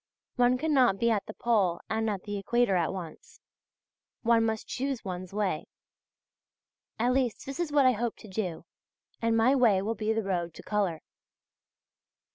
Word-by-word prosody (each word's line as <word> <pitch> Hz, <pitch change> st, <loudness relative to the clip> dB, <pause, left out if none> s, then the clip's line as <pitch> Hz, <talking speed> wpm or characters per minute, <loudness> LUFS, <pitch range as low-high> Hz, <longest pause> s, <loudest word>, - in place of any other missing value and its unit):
One 245 Hz, 0 st, +3 dB
cannot 260 Hz, -8 st, +3 dB
be 235 Hz, +3 st, +2 dB
at 210 Hz, -3 st, 0 dB
the 215 Hz, -, -6 dB
Pole 200 Hz, -8 st, +1 dB
and 220 Hz, 0 st, 0 dB
at 200 Hz, -3 st, -3 dB
the 205 Hz, -1 st, -4 dB
Equator 225 Hz, 0 st, +2 dB
at 170 Hz, -3 st, +1 dB
once. 175 Hz, -5 st, -9 dB, 0.8 s
One 230 Hz, -1 st, +4 dB
must 220 Hz, -1 st, -3 dB
choose 265 Hz, -3 st, -3 dB
one's 185 Hz, -1 st, -5 dB
way; 200 Hz, -5 st, -1 dB, 1.3 s
at 245 Hz, +3 st, +2 dB
least 255 Hz, -4 st, 0 dB
this 275 Hz, +3 st, -6 dB
is 340 Hz, -4 st, -1 dB
what 285 Hz, -2 st, +4 dB
I 255 Hz, -, +7 dB
hope 235 Hz, 0 st, -2 dB
to -, -, -13 dB
do, 185 Hz, -4 st, -4 dB, 0.6 s
and 230 Hz, 0 st, +2 dB
my 235 Hz, +4 st, +4 dB
way 235 Hz, -8 st, +4 dB
will 210 Hz, +4 st, -1 dB
be 220 Hz, -1 st, -1 dB
the 220 Hz, 0 st, 0 dB
road 175 Hz, -4 st, -2 dB
to -, -, -11 dB
colour. 195 Hz, -6 st, -1 dB
220 Hz, 170 wpm, -29 LUFS, 195-245 Hz, 1.3 s, I